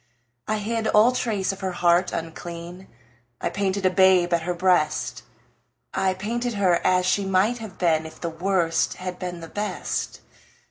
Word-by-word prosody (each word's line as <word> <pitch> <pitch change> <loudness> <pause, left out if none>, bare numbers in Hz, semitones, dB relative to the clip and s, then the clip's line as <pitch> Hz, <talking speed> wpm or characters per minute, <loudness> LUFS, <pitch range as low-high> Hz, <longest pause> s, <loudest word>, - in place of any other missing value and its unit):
I 215 - 0
hid 220 +1 -2
all 220 +3 +5
trace 215 -7 -1
of 195 - -8
her 190 -2 -3
heart 175 +1 +3
unclean; 170 +2 -7 0.5
I - - -1
painted 195 -1 -1
a 185 - +4
babe 185 -2 +4
at 170 - +2
her 175 +2 -2
breast; 170 -9 +1 0.7
I 190 -1 +1
painted 235 +4 -3
her 185 -4 +2
as 185 0 +3
she 200 +2 +2
might 195 +5 +1
have 215 -4 -9
been 160 -3 +1
If 160 - -13
the 170 - -3
Worst 170 -1 0
had 185 -1 -6
been 180 -2 -5
the 165 - -8
Best. 205 +5 -4
185 Hz, 170 wpm, -24 LUFS, 175-200 Hz, 0.7 s, all